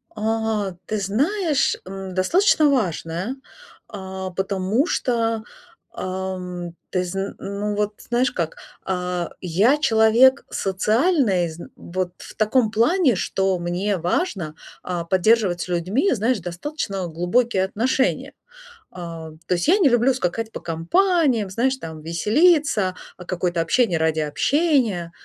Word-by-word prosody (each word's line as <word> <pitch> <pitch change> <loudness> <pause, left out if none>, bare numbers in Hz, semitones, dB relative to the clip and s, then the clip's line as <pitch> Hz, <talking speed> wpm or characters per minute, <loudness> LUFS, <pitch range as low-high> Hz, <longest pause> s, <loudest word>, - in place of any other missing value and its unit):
А, 220 -2 -1
ты 215 - -2
знаешь, 285 - +1
м, 190 0 -7
достаточно 310 - +3
важное, 185 - -1 0.5
а, 190 -2 -6
потому 195 - 0
что, 230 -8 0 0.5
а, 190 0 -4
м, 180 -2 -7
ты 185 -1 0
зн 195 +2 -4
ну 205 +1 -3
вот 210 0 -1 0.2
знаешь 245 +2 +2
как, 165 -2 -3 0.3
а, 180 -2 -2
я 195 - +3
человек 240 0 +4
социальный 210 - +1
зн 160 +2 -9
вот 180 0 -4
в - - -11
таком 220 +1 +2
плане, 250 - +3
что 190 +1 0
мне 180 +4 -1
важно, 175 - -2 0.3
а, 175 -2 -3
поддерживать 190 0 +2
с - - -4
людьми, 185 - +1
знаешь, 230 +1 +1
достаточно, 195 - -5
э, 185 -2 -2
глубокие 185 +6 +1
отношения. 255 +6 0 0.6
А, 165 -3 -8 0.2
то - - +1
есть 175 - -2
я 360 +5 +5
не 325 -8 +5
люблю 240 +2 +3
скакать 225 0 -2
по - - -6
компаниям, 240 - +1
знаешь, 255 +7 0
там, 160 -8 -8
веселиться, 210 - +2 0.2
а, 180 - -10
какое-то 175 -1 -1
общение 175 0 +2
ради 160 -1 +1
общения. 230 - +1
195 Hz, 130 wpm, -22 LUFS, 180-245 Hz, 0.6 s, я